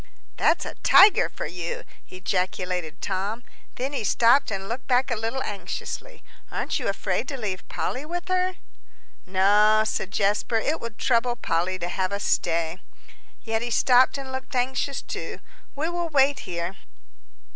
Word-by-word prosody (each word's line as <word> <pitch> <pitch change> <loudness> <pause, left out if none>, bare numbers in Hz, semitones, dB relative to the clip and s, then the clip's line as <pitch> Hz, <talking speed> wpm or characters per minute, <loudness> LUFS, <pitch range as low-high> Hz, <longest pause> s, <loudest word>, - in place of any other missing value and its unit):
"That's - - +2
a - - -5
tiger 395 +3 +7
for - - -6
you!" 175 -1 -5 0.3
ejaculated 180 -2 -2
Tom. 200 +5 -2 0.3
Then 265 +3 -3
he 275 - -2
stopped 235 +6 +4
and 195 -2 -4
looked 240 +4 -5
back 255 +1 +2
a - - +2
little 225 +4 -2
anxiously. 205 -2 -6 0.3
"Aren't - - -2
you - - -3
afraid - - -1
to 275 - -4
leave 200 -6 -4
Polly 255 - -3
with 345 +3 -5
her?" 370 0 +1 0.7
"No," 205 +3 +4
said 215 -3 -2
Jasper; 205 +4 0
"it 300 +8 -1
would 230 -2 -7
trouble 240 -1 +2
Polly 185 -4 -1
to 175 - -3
have 185 +1 -1
us 200 0 -2
stay." 165 +1 0 0.6
Yet 225 -1 -1
he 240 - -3
stopped 255 +3 +4
and 270 -1 -7
looked 260 0 -6
anxious 260 +2 0
too. - - -5 0.4
"We 300 +3 -1
will 345 0 -2
wait 280 -2 +3
here." 170 +2 -3
225 Hz, 155 wpm, -25 LUFS, 185-265 Hz, 0.7 s, tiger